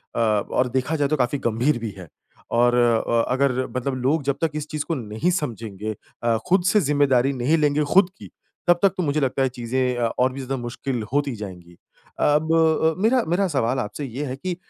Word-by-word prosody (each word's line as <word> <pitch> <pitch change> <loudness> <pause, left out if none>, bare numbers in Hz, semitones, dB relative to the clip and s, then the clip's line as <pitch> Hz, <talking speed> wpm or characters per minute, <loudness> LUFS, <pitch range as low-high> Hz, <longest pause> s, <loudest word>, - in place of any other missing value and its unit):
अ, - - -1
और 110 +3 +1
देखा 130 +5 -1
जाए 145 -2 +1
तो 155 - +1
काफ़ी 125 +2 0
गंभीर 120 +5 +1
भी 115 -1 -4
है। 90 -2 -10 0.5
और 120 +1 +4
अ, 120 -1 +2
अगर 130 -1 +1
मतलब 130 +1 -1
लोग 145 +3 +1
जब 140 0 -1
तक 165 -2 +1
इस 150 0 -4
चीज़ 150 -2 -3
को 165 - -2
नहीं 110 +6 -2
समझेंगे 110 -5 -5 0.3
अ, 115 -1 +2
खुद 185 0 +3
से 210 - +4
ज़िम्मेदारी 140 -3 +2
नहीं 135 +5 +1
लेंगे 150 -1 +2
खुद 190 -1 +6
की, - - -12 0.4
तब 175 0 +5
तक 195 - +7
तो 185 - 0
मुझे 150 -1 0
लगता 135 0 0
है 130 - +1
चीज़ें 125 +1 -1
अ, 120 - +1
और 130 +1 +3
भी 135 - -7
ज़्यादा 135 +1 -3
मुश्किल 120 0 -4
होती 145 -3 0
जाएँगी। 90 -5 -9 0.4
अब 150 +2 +2
अ, 160 0 +3
मेरा 240 +4 +4
मेरा 180 +4 +1
सवाल 130 -5 0
आपसे 130 +5 -4
ये 135 +3 -5
है 130 -2 -4
कि 180 +6 -4
135 Hz, 210 wpm, -23 LUFS, 120-150 Hz, 0.5 s, तक